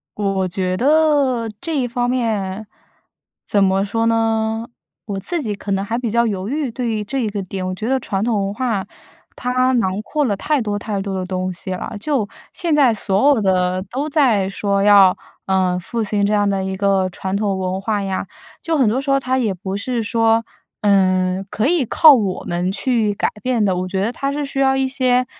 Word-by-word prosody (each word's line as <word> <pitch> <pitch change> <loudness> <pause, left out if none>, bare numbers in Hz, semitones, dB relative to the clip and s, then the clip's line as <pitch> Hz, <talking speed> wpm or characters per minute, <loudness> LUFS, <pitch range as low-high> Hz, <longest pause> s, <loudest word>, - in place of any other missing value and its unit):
我 200 -2 -1
我 190 -1 0
觉 185 0 -2
得 280 -2 +2
这 325 -2 -2
一 250 -3 0
方 245 +1 -1
面， 215 -5 -1 0.8
怎 200 -1 +2
么 195 +1 +2
说 225 +3 0
呢， 225 0 0 0.4
我 200 -2 -4
自 335 - -1
己 215 - -2
可 200 0 -6
能 195 0 0
还 225 +3 -2
比 240 - -2
较 235 +2 +2
犹 200 -1 -2
豫， 285 -3 -2
对 240 +1 -3
于 215 -2 -1
这 270 +7 -3
一 225 -4 0
个 205 -1 -4
点， 185 0 -5
我 185 - -3
觉 220 +4 -4
得 265 0 +1
传 195 -4 -2
统 215 -4 0
文 200 - -4
化 225 -4 -2 0.5
它 255 +1 +1
囊 205 -5 0
括 295 +6 -1
了 210 -5 0
太 295 +9 0
多 210 -3 -2
太 205 -1 -3
多 195 0 -4
的 - - -3
东 185 0 -3
西 185 - -5
了。 185 - -5
就 260 -4 -1 0.2
现 335 -4 -1
在 275 -5 +5
所 205 +2 +1
有 280 -5 +4
的 185 -1 +1
都 280 +5 -2
在 235 -11 +2
说 200 0 -1
要， 200 -2 +6 0.3
呃， 185 -1 +1
复 230 +5 -3
兴 205 -1 0
这 205 - +1
样 205 -1 +2
的 195 -1 -1
一 190 0 -3
个 195 -1 +1
传 190 +2 -3
统 200 -2 -1
文 185 0 -2
化 205 +1 -1
呀， 195 -1 -2 0.4
就 330 - 0
很 260 -7 +3
多 245 +5 0
时 275 0 -2
候 275 - +4
它 260 -1 -1
也 225 -6 0
不 190 +2 -5
是 235 +3 -2
说， 225 +1 +2 0.4
嗯， 185 -2 +2
可 220 +5 0
以 330 -5 +2
靠 310 +6 +7
我 200 -6 -2
们 175 +2 -1
去 215 +1 0
改 200 - 0
变 250 -4 +1
的。 190 -3 +2
我 185 +1 -2
觉 190 +1 -2
得 225 - 0
它 275 +2 -3
是 295 0 -2
需 275 0 -4
要 265 -1 +3
一 270 0 +1
些， 255 -2 +1
210 Hz, 235 characters per minute, -19 LUFS, 195-250 Hz, 0.8 s, 靠